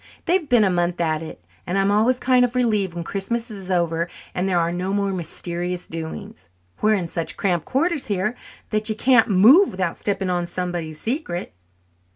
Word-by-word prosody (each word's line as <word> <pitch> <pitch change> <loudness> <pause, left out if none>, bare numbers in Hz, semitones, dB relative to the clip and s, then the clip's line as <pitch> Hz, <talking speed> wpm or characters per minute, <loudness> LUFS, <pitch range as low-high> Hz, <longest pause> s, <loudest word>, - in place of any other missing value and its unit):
They've 340 -3 +1
been 240 -3 +5
a 195 - +3
month 175 0 0
at 160 -2 0
it, 160 - -10 0.2
and 180 +3 -1
I'm 195 +1 +2
always 230 +5 +3
kind 255 -1 +4
of 245 0 0
relieved 210 -7 +1
when 170 - -4
Christmas 225 +6 -2
is 195 -3 -6
over 170 -1 0 0.2
and 185 +2 -1
there 180 - +2
are 170 0 +1
no 180 +2 -2
more 200 -1 0
mysterious 175 +1 -3
doings. 160 - -8 0.3
We're 215 0 +4
in 180 -4 -2
such 165 0 -4
cramped 175 -4 0
quarters 305 +2 0
here 205 +3 -1 0.4
that 215 0 0
you 215 - -1
can't 240 0 +4
move 230 - +6
without 185 -2 -2
stepping 195 -2 -1
on 175 -1 -1
somebody's 175 -4 -4
secret." 220 - -3
190 Hz, 190 wpm, -22 LUFS, 175-220 Hz, 0.4 s, move